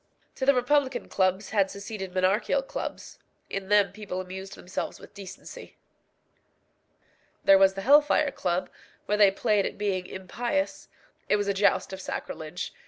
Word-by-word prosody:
To 265 Hz, -, -4 dB
the 280 Hz, -, +6 dB
republican 260 Hz, +1 st, +1 dB
clubs 190 Hz, +1 st, 0 dB
had 200 Hz, -3 st, +2 dB
succeeded 200 Hz, -2 st, -7 dB
monarchical 195 Hz, -, +2 dB
clubs. -, -, -6 dB, 0.3 s
In 195 Hz, -1 st, -4 dB
them 205 Hz, -1 st, +4 dB
people 200 Hz, -3 st, -6 dB
amused 190 Hz, +2 st, -7 dB
themselves 180 Hz, -, -5 dB
with -, -, -14 dB
decency. 200 Hz, -, -10 dB, 1.7 s
There 195 Hz, -1 st, +7 dB
was 195 Hz, 0 st, +5 dB
the 195 Hz, -, -4 dB
Hell 285 Hz, +8 st, +7 dB
fire 295 Hz, 0 st, +1 dB
Club, 180 Hz, -5 st, -2 dB, 0.3 s
where 210 Hz, 0 st, 0 dB
they 205 Hz, -2 st, +8 dB
played 205 Hz, 0 st, +1 dB
at -, -, -8 dB
being 195 Hz, -3 st, -1 dB
impious. 240 Hz, +10 st, -3 dB, 0.4 s
It -, -, +5 dB
was 205 Hz, -1 st, -1 dB
a 200 Hz, -, +2 dB
joust 200 Hz, -1 st, +2 dB
of 190 Hz, -, -6 dB
sacrilege. 160 Hz, -2 st, -5 dB
200 Hz, 155 wpm, -27 LUFS, 190-235 Hz, 1.7 s, they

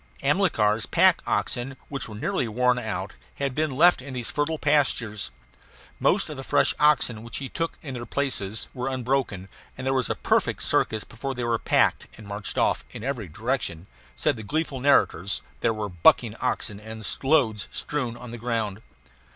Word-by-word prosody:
Amilcar's 135 Hz, -, +2 dB
pack -, -, +5 dB
oxen, 130 Hz, +2 st, -1 dB
which 135 Hz, -5 st, -4 dB
were 105 Hz, -, -8 dB
nearly 115 Hz, +3 st, -1 dB
worn 125 Hz, +3 st, +2 dB
out, 110 Hz, -, -4 dB, 0.2 s
had 140 Hz, -2 st, -2 dB
been 155 Hz, +3 st, 0 dB
left 160 Hz, +4 st, +5 dB
in 130 Hz, 0 st, -8 dB
these 120 Hz, -2 st, -3 dB
fertile 150 Hz, +2 st, 0 dB
pastures. 135 Hz, -, +1 dB, 0.7 s
Most -, -, +3 dB
of -, -, -6 dB
the -, -, -6 dB
fresh -, -, +3 dB
oxen 135 Hz, -7 st, +3 dB
which 115 Hz, +1 st, -7 dB
he 135 Hz, -2 st, -5 dB
took 165 Hz, 0 st, -3 dB
in 135 Hz, -4 st, -6 dB
their 120 Hz, -2 st, -6 dB
places 110 Hz, -8 st, -1 dB
were 125 Hz, -1 st, -3 dB
unbroken, 125 Hz, -7 st, -1 dB, 0.3 s
and 130 Hz, -, -6 dB
there 135 Hz, -, +2 dB
was 130 Hz, -2 st, +1 dB
a -, -, 0 dB
perfect -, -, +1 dB
circus 110 Hz, -1 st, +1 dB
before 130 Hz, +4 st, -5 dB
they 120 Hz, -, -3 dB
were 115 Hz, -1 st, +1 dB
packed -, -, +2 dB
and 110 Hz, -, -11 dB
marched 100 Hz, 0 st, -5 dB
off; -, -, +2 dB
in -, -, -8 dB
every 125 Hz, -6 st, -3 dB
direction, 100 Hz, -, -2 dB, 0.3 s
said -, -, +1 dB
the -, -, -6 dB
gleeful 145 Hz, +4 st, -2 dB
narrators, 105 Hz, -, +2 dB, 0.2 s
there 115 Hz, -, +2 dB
were 110 Hz, -2 st, -3 dB
bucking 90 Hz, -3 st, +4 dB
oxen 100 Hz, -, -2 dB
and 110 Hz, 0 st, -8 dB, 0.2 s
loads 130 Hz, -8 st, +2 dB
strewed 125 Hz, -6 st, -3 dB
on 125 Hz, -1 st, -9 dB
the 120 Hz, -, -7 dB
ground. 110 Hz, -3 st, -2 dB
125 Hz, 180 wpm, -26 LUFS, 110-135 Hz, 0.7 s, pack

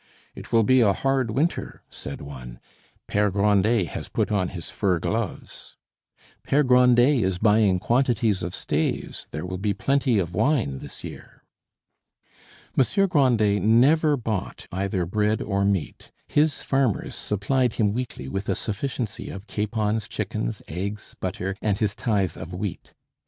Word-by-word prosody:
"It -, -, -11 dB
will 115 Hz, -1 st, +5 dB
be 130 Hz, +3 st, +4 dB
a 100 Hz, -4 st, +4 dB
hard 135 Hz, +2 st, 0 dB
winter," 145 Hz, +10 st, -2 dB
said -, -, -7 dB
one; 65 Hz, -4 st, -9 dB, 0.5 s
"Pere 105 Hz, 0 st, +1 dB
Grandet 100 Hz, -1 st, +2 dB
has -, -, -6 dB
put -, -, -1 dB
on 95 Hz, -3 st, +1 dB
his 85 Hz, -2 st, -7 dB
fur 95 Hz, -4 st, +1 dB
gloves." 80 Hz, -, -4 dB, 0.7 s
"Pere 145 Hz, +2 st, +2 dB
Grandet 125 Hz, 0 st, +5 dB
is 95 Hz, -1 st, 0 dB
buying 105 Hz, -2 st, +4 dB
quantities 115 Hz, -2 st, +1 dB
of 85 Hz, +1 st, -4 dB
staves; -, -, -2 dB
there 75 Hz, +4 st, -5 dB
will 90 Hz, 0 st, -5 dB
be 100 Hz, 0 st, 0 dB
plenty 135 Hz, -4 st, +1 dB
of 90 Hz, -3 st, -1 dB
wine 110 Hz, -, +1 dB
this -, -, -10 dB
year." -, -, -10 dB, 1.3 s
Monsieur 195 Hz, -, +3 dB
Grandet 120 Hz, -, +3 dB
never 145 Hz, -, +4 dB
bought 110 Hz, -6 st, -4 dB
either 95 Hz, -1 st, -1 dB
bread 105 Hz, +4 st, +1 dB
or 100 Hz, -1 st, -1 dB
meat. 100 Hz, -4 st, -2 dB, 0.2 s
His 150 Hz, 0 st, +1 dB
farmers 135 Hz, -6 st, 0 dB
supplied 120 Hz, +5 st, 0 dB
him 105 Hz, -2 st, +1 dB
weekly 120 Hz, -, -4 dB
with 95 Hz, +9 st, -4 dB
a -, -, +2 dB
sufficiency 115 Hz, 0 st, -4 dB
of 95 Hz, +1 st, -8 dB
capons, 110 Hz, 0 st, -1 dB
chickens, -, -, -3 dB
eggs, 100 Hz, +5 st, -5 dB
butter, 95 Hz, +1 st, -3 dB
and 105 Hz, -3 st, +1 dB
his 105 Hz, -2 st, 0 dB
tithe 100 Hz, -8 st, -1 dB
of 85 Hz, +2 st, -7 dB
wheat. 95 Hz, 0 st, -6 dB
105 Hz, 145 wpm, -24 LUFS, 95-125 Hz, 1.3 s, will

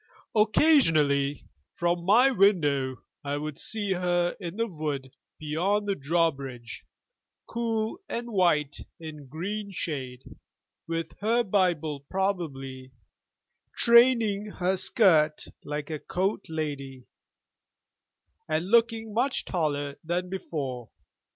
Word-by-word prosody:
Occasionally, 165 Hz, -, +3 dB, 0.3 s
from 175 Hz, 0 st, 0 dB
my 240 Hz, +8 st, +6 dB
window 145 Hz, -, +2 dB, 0.2 s
I 145 Hz, 0 st, -2 dB
would 150 Hz, -1 st, -5 dB
see 205 Hz, -3 st, -1 dB
her 175 Hz, -1 st, 0 dB
in 175 Hz, -2 st, -6 dB
the 230 Hz, -, +1 dB
wood 150 Hz, -, -4 dB, 0.3 s
beyond 180 Hz, +7 st, 0 dB
the 200 Hz, -, +2 dB
drawbridge, 135 Hz, -7 st, -2 dB, 0.6 s
cool 225 Hz, +4 st, -2 dB
and 235 Hz, 0 st, -4 dB
white 160 Hz, -8 st, +2 dB, 0.2 s
in 155 Hz, -3 st, -9 dB
green 200 Hz, +9 st, -4 dB
shade, 135 Hz, -9 st, -5 dB, 0.6 s
with 165 Hz, 0 st, -3 dB
her 230 Hz, +3 st, +2 dB
Bible 175 Hz, -8 st, +1 dB
probably, 140 Hz, -7 st, -3 dB, 0.8 s
training 235 Hz, -4 st, +5 dB
her 190 Hz, -2 st, -1 dB
skirt 160 Hz, -6 st, +3 dB, 0.2 s
like 150 Hz, +1 st, -5 dB
a 155 Hz, -, -3 dB
court 190 Hz, +4 st, -2 dB
lady, 140 Hz, -5 st, -5 dB, 1.4 s
and 160 Hz, +5 st, -1 dB
looking 230 Hz, -2 st, +3 dB
much 255 Hz, +5 st, 0 dB
taller 145 Hz, -4 st, -2 dB
than 175 Hz, +2 st, -2 dB
before. 135 Hz, -, -4 dB
170 Hz, 105 wpm, -27 LUFS, 145-205 Hz, 1.4 s, my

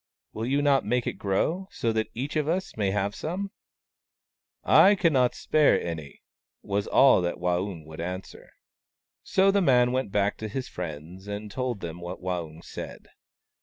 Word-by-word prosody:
" -, -, -57 dB
Will 110 Hz, +2 st, -3 dB
you 140 Hz, +2 st, +1 dB
not 140 Hz, -3 st, +4 dB
make 125 Hz, +2 st, 0 dB
it -, -, -4 dB
grow, 155 Hz, -, 0 dB
so 115 Hz, -1 st, -1 dB
that 110 Hz, 0 st, -1 dB
each 135 Hz, +6 st, -4 dB
of 150 Hz, -1 st, +1 dB
us 185 Hz, +4 st, -1 dB
may 105 Hz, -3 st, 0 dB
have 100 Hz, +1 st, -1 dB
some? 190 Hz, -, -4 dB, 0.4 s
" -, -, -, 0.2 s
" -, -, -60 dB, 0.2 s
I 205 Hz, -, +6 dB
cannot 140 Hz, -10 st, +2 dB
spare 155 Hz, -1 st, +3 dB
any," 80 Hz, -4 st, -6 dB, 0.4 s
was 100 Hz, +1 st, -1 dB
all 135 Hz, -8 st, +6 dB
that 85 Hz, 0 st, -1 dB
Waung 90 Hz, -1 st, -2 dB
would 80 Hz, +1 st, -8 dB
answer. 90 Hz, +2 st, -6 dB, 0.7 s
So 195 Hz, +1 st, +3 dB
the 200 Hz, 0 st, +2 dB
man 125 Hz, -6 st, +4 dB
went 130 Hz, -5 st, -1 dB
back 100 Hz, 0 st, +1 dB
to 110 Hz, -, -5 dB
his 130 Hz, +5 st, -4 dB
friends, 85 Hz, +3 st, -7 dB
and 105 Hz, 0 st, -5 dB
told 125 Hz, -3 st, -3 dB
them 85 Hz, +1 st, -6 dB
what 85 Hz, +1 st, -6 dB
Waung 85 Hz, -3 st, -4 dB
said. -, -, -8 dB
105 Hz, 180 wpm, -27 LUFS, 90-135 Hz, 0.7 s, I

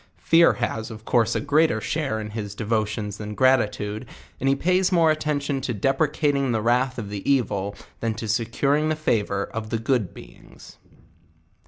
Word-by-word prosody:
Fear 165 Hz, +1 st, +5 dB
has 110 Hz, 0 st, -3 dB
of 110 Hz, -1 st, -10 dB
course 115 Hz, -2 st, +2 dB
a -, -, +1 dB
greater 145 Hz, -4 st, +2 dB
share 135 Hz, -3 st, -2 dB
in 105 Hz, -1 st, -6 dB
his 105 Hz, -2 st, -5 dB
de 110 Hz, -, -5 dB
votions 105 Hz, -1 st, -1 dB
than 105 Hz, 0 st, -6 dB
gratitude, 110 Hz, -3 st, +1 dB, 0.3 s
and 135 Hz, -, +1 dB
he 135 Hz, -, +3 dB
pays 180 Hz, +5 st, +2 dB
more 165 Hz, -3 st, +4 dB
attention 145 Hz, -3 st, -1 dB
to 125 Hz, -3 st, -3 dB
depre 135 Hz, +8 st, +1 dB
cating 140 Hz, -5 st, +1 dB
the 110 Hz, -, 0 dB
wrath 125 Hz, +2 st, +1 dB
of 105 Hz, -4 st, -5 dB
the 100 Hz, -1 st, -4 dB
evil, 100 Hz, -7 st, 0 dB, 0.2 s
than 115 Hz, -1 st, -1 dB
to 110 Hz, 0 st, -5 dB
securing 140 Hz, +8 st, +1 dB
the 155 Hz, -, +1 dB
favour 105 Hz, -9 st, 0 dB
of 110 Hz, -1 st, -4 dB
the 115 Hz, -, -1 dB
good 115 Hz, -3 st, 0 dB
beings. -, -, -15 dB
120 Hz, 180 wpm, -24 LUFS, 110-140 Hz, 0.3 s, Fear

